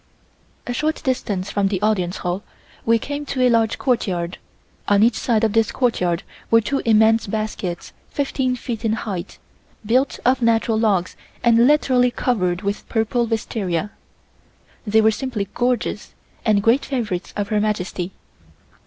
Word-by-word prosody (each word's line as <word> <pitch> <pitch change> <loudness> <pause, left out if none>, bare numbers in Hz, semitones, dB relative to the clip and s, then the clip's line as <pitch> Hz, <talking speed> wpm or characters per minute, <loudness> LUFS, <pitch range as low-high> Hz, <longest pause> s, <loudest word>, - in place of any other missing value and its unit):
A 245 - -3
short 310 +5 -1
distance 205 -8 -2
from 200 -1 +1
the 195 -1 -1
Audience 190 -5 +1
Hall 180 +2 -1 0.5
we 230 0 +5
came 285 +5 -4
to 260 - -2
a 250 - +5
large 225 -1 +2
courtyard. 185 -9 -1 0.5
On 205 0 +4
each 235 +1 +4
side 225 -1 0
of 220 -2 +2
this 225 -1 +2
courtyard 180 -8 0 0.3
were 230 - +6
two 270 +5 -1
immense 220 0 +4
baskets 205 -4 -4 0.2
fifteen 265 -2 -1
feet 240 -2 -5
in 220 -1 +1
height, 200 -5 -5 0.5
built 255 +5 +2
of 255 +1 +3
natural 225 -1 +2
logs 195 -5 +1 0.3
and 235 0 +5
literally 260 -4 +4
covered 185 -8 -1
with 200 +1 -3
purple 230 +1 0
wisteria. 210 -4 -2 1.0
They 220 +2 +4
were 220 0 +5
simply 220 -3 -3
gorgeous 245 -3 -1 0.3
and 210 -3 +2
great 235 +5 +4
favorites 215 -9 -3
of 205 -1 -2
Her 210 -1 +1
Majesty. 190 -3 -2
220 Hz, 150 wpm, -21 LUFS, 200-245 Hz, 1.0 s, were